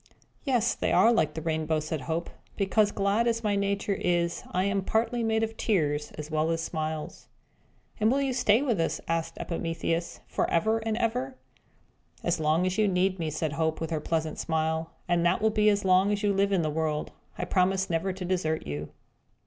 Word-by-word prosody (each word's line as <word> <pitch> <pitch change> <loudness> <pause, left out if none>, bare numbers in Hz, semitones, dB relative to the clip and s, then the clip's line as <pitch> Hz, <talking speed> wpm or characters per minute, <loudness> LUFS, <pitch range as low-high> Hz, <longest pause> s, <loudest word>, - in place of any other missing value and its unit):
"Yes, 245 -4 +2
they - - -1
are 235 - +5
like 155 -9 +1
the 160 - -4
rainbow," 160 -1 0
said 155 -1 -4
Hope, 165 +4 -3 0.3
"because, 205 +1 +2
glad 200 +4 +1
as 230 0 0
my 210 -1 +1
nature 200 0 0
is, 175 -2 0
I 180 +1 +1
am 200 0 +1
partly 235 +4 0
made 220 0 +1
of 225 0 -2
tears 150 -8 0
as 150 +1 -7
well 155 +1 +1
as 165 0 0
smiles." 155 -1 -4 0.7
"And 215 +1 +3
will 275 - +2
you 275 -2 0
stay 245 0 +3
with 235 -10 0
us," 165 - -1
asked 165 0 -2
Epimetheus, 165 0 -3
"forever 220 +7 +1
and 220 0 -2
ever?" 250 +3 -1 0.9
"As 175 -1 0
long 155 +3 +2
as 185 +3 -1
you 215 - +4
need 185 0 +1
me," 160 -2 -1
said 155 0 -2
Hope, 160 0 0
with 165 0 -4
her 155 -2 -1
pleasant 160 0 -2
smile 160 0 -1 0.2
"and 175 -1 +2
that 175 - +3
will 220 +1 +2
be 215 0 +4
as 200 -1 +1
long 185 +2 +4
as 205 0 -1
you 205 -1 +3
live 200 +1 +2
in 185 -4 +2
the 155 - 0
world 155 -1 -1 0.3
I - - -2
promise 190 +1 +1
never 170 +3 0
to 185 0 -6
desert 175 -4 -1
you. 75 +1 -5
180 Hz, 200 wpm, -28 LUFS, 160-210 Hz, 0.9 s, are